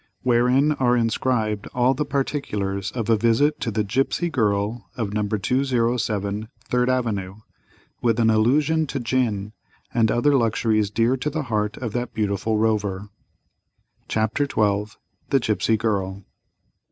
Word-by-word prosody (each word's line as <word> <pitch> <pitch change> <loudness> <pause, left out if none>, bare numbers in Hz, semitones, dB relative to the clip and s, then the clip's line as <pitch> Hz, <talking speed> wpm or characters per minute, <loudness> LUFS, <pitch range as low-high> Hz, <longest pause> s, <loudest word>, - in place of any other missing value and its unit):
Wherein 125 +4 +3
are 125 -4 +2
inscribed 115 -2 0
all 125 +1 +3
the 150 +3 -2
particulars 105 -9 -2
of 115 -4 -3
a 115 - +4
visit 115 +7 +2
to - - -2
the 110 -1 0
"Gipsy 135 - 0
Girl," 105 - -1
of 105 -4 -2
No. 105 -1 0
207, 110 -2 0 0.2
Third 125 0 +1
Avenue, 105 -7 -1 0.7
with 115 -1 +1
an 110 -1 +4
allusion 145 +8 +2
to 135 - -3
Gin, 115 -5 -1 0.4
and 115 -2 +3
other 145 +5 +3
luxuries 110 -3 +1
dear 115 +5 +1
to 135 +4 -2
the 155 +1 -3
heart 105 -4 -1
of 115 -4 -5
that 120 0 -3
beautiful 105 +1 0
Rover. 105 -2 0 1.0
CHAPTER 110 +6 0
XII. 105 -5 0 0.4
THE 135 - +3
GIPSY 110 -1 +1
GIRL. 100 -3 -2
115 Hz, 140 wpm, -23 LUFS, 105-125 Hz, 1.0 s, a